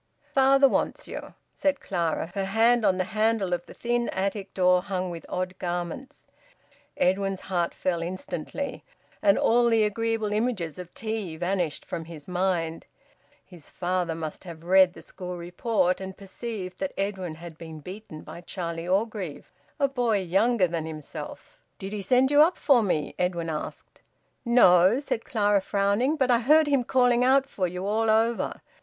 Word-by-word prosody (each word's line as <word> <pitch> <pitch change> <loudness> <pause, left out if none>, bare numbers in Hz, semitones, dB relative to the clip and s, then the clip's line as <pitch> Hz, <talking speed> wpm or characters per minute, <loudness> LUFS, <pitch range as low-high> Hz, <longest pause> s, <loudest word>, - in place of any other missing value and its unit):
"Father 275 +1 +6
wants - - -1
you," - - -8 0.2
said 285 -1 0
Clara, 170 -2 -2
her 195 -1 -1
hand 225 +4 +3
on 185 -3 +3
the 185 - +1
handle 215 -1 0
of 175 0 -3
the - - -11
thin 240 0 -1
attic 195 +1 -2
door 180 -1 +4
hung 185 -2 -3
with 170 -1 -8
odd 185 0 -3
garments. 175 +8 -5 0.7
Edwin's 195 +1 +1
heart 175 -3 -1
fell 175 -2 -2
instantly, 185 - -5 0.4
and 200 -1 +4
all 235 +1 +4
the 225 -1 +4
agreeable 220 0 -1
images 210 -8 -1
of 180 -1 -8
tea 215 -7 -4
vanished 175 -2 -1
from 165 - -5
his 160 -3 -11
mind. 175 -3 -1 0.6
His 175 -5 -13
father 180 -2 -1
must 160 -2 -6
have 165 -3 -10
read 185 0 +5
the - - -12
school 180 -1 -7
report 180 +2 0
and 190 0 -7
perceived 195 -2 -6
that 285 - -3
Edwin 190 -4 -3
had 165 0 -10
been 160 -1 -9
beaten 180 -1 -9
by 170 - -10
Charlie 170 -2 -5
Orgreave, 195 -4 -2 0.3
a 280 - +4
boy 240 -6 +1
younger 195 +4 +2
than 165 -2 -3
himself! 155 -2 -8 0.2
"Did 195 +2 -6
he 210 - -3
send 255 +7 +3
you 290 0 +7
up 340 +4 +4
for 270 -5 +4
me?" 170 -8 -1
Edwin 170 -2 -1
asked. 150 - -7 0.4
"No," 200 -2 +6
said 255 -5 -3
Clara, 205 -3 +2
frowning. 200 +9 +1
"But 260 -4 +2
I 235 - +5
heard 305 +6 +5
him 280 -3 +2
calling 245 -1 +3
out 270 +1 +4
for 190 -8 -1
you 180 +2 -5
all 220 +2 +1
over. 225 +2 +1
195 Hz, 165 wpm, -26 LUFS, 175-230 Hz, 0.7 s, you